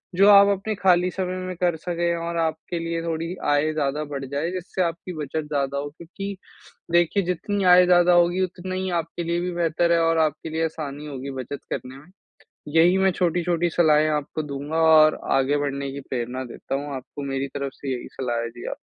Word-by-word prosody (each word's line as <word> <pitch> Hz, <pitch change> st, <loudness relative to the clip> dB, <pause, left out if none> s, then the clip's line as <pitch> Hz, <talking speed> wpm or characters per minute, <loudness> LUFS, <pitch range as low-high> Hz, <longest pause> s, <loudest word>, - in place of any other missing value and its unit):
जो 195 Hz, +3 st, +6 dB
आप 200 Hz, 0 st, +8 dB
अपने 215 Hz, +2 st, -3 dB
खाली 180 Hz, -2 st, +3 dB
समय 185 Hz, -1 st, -3 dB
में 185 Hz, -, -4 dB
कर 175 Hz, -2 st, +1 dB
सकें 170 Hz, -1 st, 0 dB
और 170 Hz, 0 st, -4 dB
आपके 160 Hz, +2 st, -5 dB
लिए 165 Hz, 0 st, -3 dB
थोड़ी 165 Hz, +1 st, -3 dB, 0.2 s
आय 145 Hz, +2 st, +2 dB
ज़्यादा 150 Hz, 0 st, -1 dB
बढ़ 135 Hz, -1 st, -4 dB
जाए, 140 Hz, +5 st, -2 dB
जिससे 185 Hz, 0 st, -4 dB
आपकी 170 Hz, +2 st, -4 dB
बचत 150 Hz, +2 st, -4 dB
ज़्यादा 140 Hz, -2 st, -1 dB
हो, 145 Hz, +1 st, -4 dB
क्योंकि 195 Hz, +4 st, -7 dB, 0.6 s
देखिए 175 Hz, +3 st, +3 dB
जितनी 195 Hz, +3 st, -2 dB
आय 180 Hz, 0 st, +7 dB
ज़्यादा 175 Hz, 0 st, +5 dB
होगी 175 Hz, +1 st, +3 dB
उतना 185 Hz, 0 st, -5 dB
ही 185 Hz, 0 st, -2 dB
आपके 165 Hz, +1 st, -7 dB
लिए 170 Hz, +1 st, -1 dB
भी 180 Hz, +1 st, -2 dB
बेहतर 170 Hz, 0 st, +1 dB
है 170 Hz, -, +3 dB
और 165 Hz, 0 st, +2 dB
आपके 155 Hz, +2 st, -7 dB
लिए 160 Hz, +1 st, 0 dB
आसानी 150 Hz, -2 st, -6 dB
होगी 140 Hz, -1 st, -6 dB
बचत 140 Hz, +3 st, -6 dB
करने 130 Hz, +1 st, -6 dB
में। 150 Hz, +6 st, -16 dB, 0.7 s
यही 175 Hz, +3 st, +6 dB
मैं 190 Hz, 0 st, +4 dB
छोटी-छोटी 175 Hz, -1 st, 0 dB
सलाहें 155 Hz, -2 st, +4 dB
आपको 150 Hz, +1 st, -2 dB
दूँगा 145 Hz, +2 st, -4 dB
और 155 Hz, -1 st, +6 dB, 0.2 s
आगे 135 Hz, +2 st, +2 dB
बढ़ने 140 Hz, -1 st, -2 dB
की 140 Hz, -, -6 dB
प्रेरणा 125 Hz, +1 st, -3 dB
देता -, -, -5 dB
हूँ 145 Hz, 0 st, -5 dB
आपको 140 Hz, +2 st, -8 dB
मेरी 135 Hz, +1 st, -2 dB
तरफ 140 Hz, -1 st, -3 dB
से 135 Hz, -2 st, -5 dB
यही 125 Hz, -, -7 dB
सलाह 120 Hz, -3 st, -1 dB
है, 115 Hz, -, -4 dB
जी, 120 Hz, +1 st, -11 dB
आप -, -, -4 dB
165 Hz, 205 wpm, -24 LUFS, 145-175 Hz, 0.7 s, आप